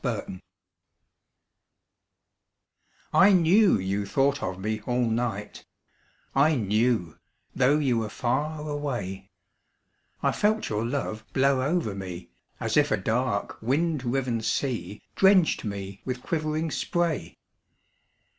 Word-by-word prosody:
Spray 95 - -3 2.7
I 195 +2 +6
knew 185 - +5
you 100 +1 -2
thought 140 +6 +1
of 95 0 -4
me 110 +2 -2
all 125 0 +1
night, 110 -3 -3 0.7
I 150 +3 +4
knew, 110 - 0 0.4
though 135 +4 +4
you 130 -6 +1
were 110 -1 -3
far 150 +8 -2
away; 120 -11 -4 0.9
I - - +3
felt 215 +1 +1
your 110 +1 -1
love 120 -4 -3
blow 135 0 +3
over 150 - 0
me 90 -3 -7 0.3
As 115 +2 -1
if 145 0 +4
a - - +2
dark 110 +2 -1
wind 145 +4 0
riven 125 -2 -1
sea 115 -3 -2
Drenched 190 -3 +4
me 100 -1 -6
with 125 -1 -4
quivering 155 0 -1
spray. 160 - -1
125 Hz, 115 wpm, -26 LUFS, 105-150 Hz, 2.7 s, I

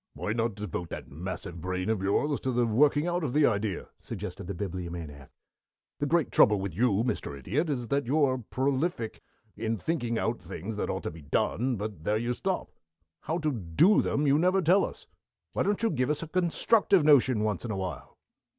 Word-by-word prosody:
"Why 105 - -2
not 115 -2 -1
devote 90 -4 -5
that - - -7
massive 85 +1 -6
brain 90 +2 -2
of 110 -3 0
yours 135 +9 +1
to 130 - -2
the 120 -1 +2
working 145 +7 +3
out 175 0 -1
of 130 -5 -2
the 150 0 +5
idea?" 105 -4 -1
suggested - - -7
the 100 - -4
Bibliomaniac. 85 -6 -6 0.7
"The 145 - 0
great 165 -2 +2
trouble 105 -2 +5
with 95 -2 -4
you, 110 +1 +2
Mr. 120 - -2
Idiot, 135 - -1
is 125 -5 -2
that 140 -3 0
you 150 +4 +3
are 130 -2 +2
prolific 130 +1 -2 0.3
in 115 0 -2
thinking 120 - -1
out 115 +1 -1
things 95 +4 -6
that - - -2
ought - - -3
to - - -3
be 80 - -11
done, 120 - 0
but 105 -6 -5
there 105 +4 +1
you 120 +2 -1
stop. 190 +8 -2 0.5
How 160 - 0
to 155 -3 0
do 115 - +3
them 145 - 0
you 140 +1 +4
never 185 +3 +3
tell 185 +5 +5
us. - - -6 0.5
Why - - 0
don't 205 +2 0
you 225 - +3
give 130 +1 0
us 150 +1 0
a - - -6
constructive 185 +2 +3
notion 130 -6 +5
once 105 -4 -1
in 120 - -5
awhile?" 95 -3 -5
120 Hz, 200 wpm, -28 LUFS, 95-150 Hz, 0.7 s, the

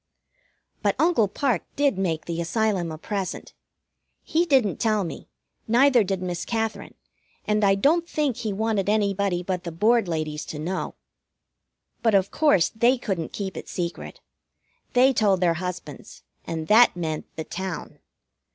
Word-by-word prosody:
But - - +1
Uncle 320 -11 +3
Parke 235 - 0
did 280 -9 +1
make 165 -4 -1
the 170 0 -3
Asylum 185 -1 0
a 155 - -6
present. 195 +2 -5 0.7
He 340 +2 +1
didn't 260 - +3
tell 215 -3 +1
me, 165 - -7 0.4
neither 245 +1 +5
did 190 -1 -2
Miss 175 -2 -3
Katherine, 225 -1 -3 0.5
and 210 0 +1
I 195 -1 +5
don't 325 - +2
think 290 -6 0
he 220 - -3
wanted 205 -1 0
anybody 200 -3 +1
but 180 -1 -3
the 170 - -5
Board 215 +5 +2
ladies 155 -2 -3
to 150 - -7
know. 175 +5 -3 1.1
But, 225 -3 +3
of 195 0 +2
course, 290 - +3
they 235 +4 +2
couldn't 190 -9 -3
keep 195 -2 -5
it - - -8
secret. 175 -1 -5 0.7
They 260 +1 +5
told 205 -5 +2
their 175 -2 +3
husbands, 180 -1 -7 0.2
and 160 -1 -4
that 225 +2 +6
meant 160 -3 -3
the 160 - -4
town. 190 +2 -6
200 Hz, 150 wpm, -24 LUFS, 175-230 Hz, 1.1 s, that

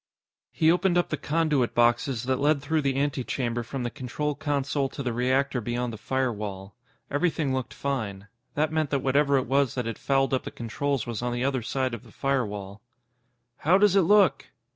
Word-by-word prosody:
He 160 +1 +3
opened 180 0 +2
up 175 - +1
the - - 0
conduit 150 -5 0
boxes 120 +1 +2
that 130 0 0
led 145 +1 +3
through 155 +3 0
the 135 -1 0
antechamber 130 -4 -1
from 125 +2 -5
the 120 - -2
control 150 +2 -3
console 140 -2 -1
to 140 - -6
the 120 -2 -1
reactor 130 +2 +1
beyond 120 +1 -2
the - - -6
firewall. 105 -7 -3 0.4
Everything 145 -2 0
looked 130 -1 -2
fine. 110 -8 -3 0.3
That 155 +1 +1
meant 155 -2 +1
that 135 -1 -1
whatever 140 +1 +3
it 130 - 0
was 135 0 +1
that 125 -2 -2
had 115 -1 -4
fouled 135 0 +1
up 130 - +1
the - - -5
controls 135 +2 -2
was 120 -2 -4
on 120 0 -1
the 120 +1 -2
other 135 -2 0
side 130 +2 -1
of 115 - -5
the - - -17
firewall. 105 -7 -2 0.8
"How 175 +5 +4
does 200 -1 +4
it 195 - +6
look?" 200 +2 +4
135 Hz, 195 wpm, -26 LUFS, 120-145 Hz, 0.8 s, it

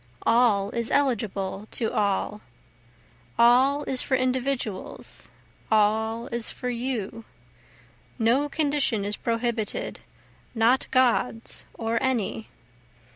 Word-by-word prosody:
All 225 -4 +3
is 235 -1 -2
eligible 210 -7 0
to 225 - -2
all, 205 +1 0 1.0
All 260 +5 +5
is 260 -3 -1
for 265 - +1
individuals, 255 -5 -3 0.4
all 220 +2 +2
is 235 -1 -2
for 250 -1 -4
you, 235 -3 -3 0.9
No 255 +5 +2
condition 285 -8 +1
is 205 +1 +1
prohibited, 230 -2 -2 0.6
not 230 +3 +3
God's 245 -2 +1
or 230 0 -1
any. 235 -4 -1
235 Hz, 95 wpm, -26 LUFS, 220-255 Hz, 1.0 s, All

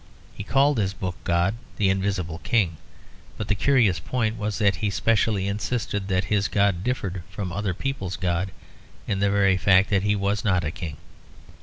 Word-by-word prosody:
He 100 - -7
called 135 +3 +3
his 95 -2 0
book 90 -1 -4
God, 85 +3 +2 0.2
the 95 -2 +3
Invisible 95 -4 -2
King; 95 -7 +1 0.6
but 105 - -5
the - - +4
curious 105 - +3
point 110 +4 -1
was 105 -3 -3
that 100 -1 +2
he 105 - -1
specially 100 0 +1
insisted 105 -1 -2
that 95 -1 +1
his 100 +2 +1
God 100 -3 +1
differed 100 -7 -2
from 95 -4 -5
other 100 -2 -2
people's 100 -6 -3
God 90 0 -1 0.6
in 100 -2 -1
the 100 0 +2
very 100 -2 +3
fact 95 +1 +4
that 100 -2 +3
he 105 +1 +1
was 100 +2 -1
not 95 -5 +2
a 80 - -2
king. 80 -4 -6
100 Hz, 180 wpm, -24 LUFS, 95-105 Hz, 0.6 s, the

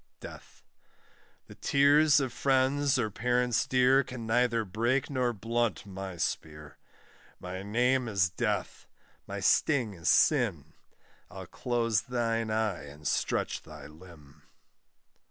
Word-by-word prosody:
DEATH. - - -12 0.8
The - - -13
tears 145 +2 +4
of 130 -4 -3
friends 135 +1 +1
or 110 -4 -1
parents 125 +2 0
dear, 130 +2 +4
Can 125 -2 -8
neither 115 0 +1
break 120 +9 -1
nor 125 -3 0
blunt 115 0 -2
my 95 -2 -7
spear: 75 -2 -5 0.6
My 90 +1 -6
name 125 +5 +1
is 100 -5 +1
Death, 85 - -3 0.4
my - - -5
sting 125 -9 +2
is 85 -2 -2
sin, 95 - +2 0.6
I'll - - -9
close 115 -4 -1
thine 115 -2 -2
eye 110 -7 -1
and 75 +1 -8
stretch - - -1
thy - - -12
limb. 75 -2 -16
115 Hz, 120 wpm, -29 LUFS, 95-130 Hz, 0.8 s, tears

